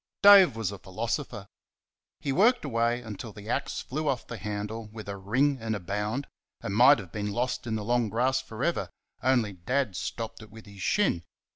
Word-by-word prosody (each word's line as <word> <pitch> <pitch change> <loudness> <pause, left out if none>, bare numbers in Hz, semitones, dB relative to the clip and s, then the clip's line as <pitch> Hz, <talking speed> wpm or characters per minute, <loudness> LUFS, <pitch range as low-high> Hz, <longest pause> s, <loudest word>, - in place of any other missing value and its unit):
Dave 195 - +9
was 110 -4 -2
a 100 - -8
philosopher. 115 - -4 0.7
He 140 - -2
worked 225 - +4
away 120 -1 0
until 110 0 -7
the 105 +1 -11
axe - - -1
flew 155 +4 -3
off 125 -3 -1
the 120 - -7
handle 105 +1 -4
with 110 0 -10
a 100 - -4
ring 130 +9 +1
and 110 -1 -1
a - - -3
bound, 105 +9 -2 0.3
and 100 - -4
might 125 +6 +8
have 95 -6 -9
been 105 -1 -3
lost 125 +2 -2
in 110 - -1
the 105 -1 -3
long 120 -1 +1
grass 130 +4 +1
for 120 -1 -7
ever 170 - 0 0.3
only 120 -5 +2
Dad 110 +4 -1
stopped 115 +5 -5
it 110 - -12
with 110 +1 -13
his 100 -2 -12
shin. 185 - +2
115 Hz, 195 wpm, -28 LUFS, 105-130 Hz, 0.7 s, Dave